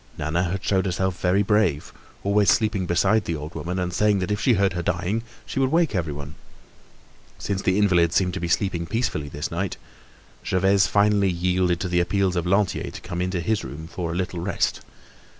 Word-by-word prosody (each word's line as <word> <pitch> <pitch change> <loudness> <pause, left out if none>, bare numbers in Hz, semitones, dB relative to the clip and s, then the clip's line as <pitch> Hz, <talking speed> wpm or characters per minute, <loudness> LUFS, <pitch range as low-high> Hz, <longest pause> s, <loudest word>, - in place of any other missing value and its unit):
Nana 85 +4 0
had 90 +2 -3
showed 95 -1 +1
herself 95 0 -2
very 95 +3 +3
brave, 105 -8 +1 0.3
always 100 0 +3
sleeping 105 -5 +2
beside 105 +6 +2
the 85 - -2
old 75 +2 -7
woman, 85 +4 -4
and 90 -1 -2
saying 105 +2 +3
that 95 +1 -2
if 105 +1 -1
she 125 - +4
heard 95 -2 +2
her 90 - -2
dying, 90 +6 -1 0.2
she - - -4
would 135 0 +2
wake 165 -4 +2
everyone. 75 -5 -3 1.0
Since 100 -1 -3
the 95 0 +1
invalid 90 -5 +3
seemed 90 0 +1
to 95 - -3
be 85 - -2
sleeping 85 -1 0
peacefully 110 -9 -2
this 75 +3 -5
night, 90 +3 -3 0.7
Gervaise 95 +1 +3
finally 100 -1 +3
yielded 90 0 +1
to 95 - -1
the 90 0 +1
appeals 95 +1 +1
of 85 0 -1
Lantier 95 +1 +1
to - - -9
come 90 -1 -4
into 90 -1 -1
his 105 +5 0
room 80 +2 -7
for 85 0 -4
a - - -4
little 90 -1 -2
rest. 90 +2 -1
90 Hz, 200 wpm, -24 LUFS, 85-100 Hz, 1.0 s, she